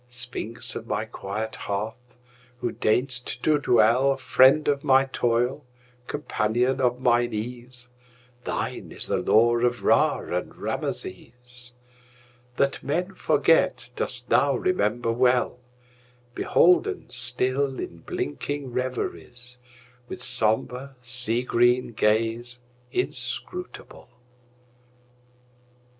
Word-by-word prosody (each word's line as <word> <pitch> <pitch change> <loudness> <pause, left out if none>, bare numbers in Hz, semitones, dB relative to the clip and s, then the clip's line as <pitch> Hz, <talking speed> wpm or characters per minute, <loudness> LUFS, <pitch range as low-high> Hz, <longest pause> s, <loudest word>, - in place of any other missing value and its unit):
Sphinx 120 -1 -5
of 115 - -6
my 105 +1 -1
quiet 110 +1 -5
hearth! 110 +5 -5 0.4
who 120 - -2
deign'st 120 +2 -1
to 155 -1 +3
dwellFriend 130 +3 +4
of 140 -1 +1
my 135 0 +5
toil, 125 +2 0 0.4
companion 125 -1 0
of 125 -1 +1
mine 120 -2 +2
ease, 125 +2 -7 0.6
Thine - - -4
is - - -5
the - - 0
lore 120 +1 +3
of 120 0 0
Ra - - +4 0.2
and - - -4
Rameses; 120 +5 -5 0.8
That 140 0 +1
men 180 +7 -2
forget 180 -5 +2
dost 125 0 0
thou 140 +2 +3
remember 120 - 0
well, 125 +1 +2 0.7
Beholden 180 +7 +3
still 130 +2 -1
in 85 - -6
blinking 130 - -4
reveriesWith 125 -1 -5 0.6
sombre, 125 +2 -1
sea 120 0 -1
green 120 0 +2
gaze 115 +3 0 0.3
inscrutable. 365 - -5
125 Hz, 95 wpm, -25 LUFS, 115-130 Hz, 0.8 s, my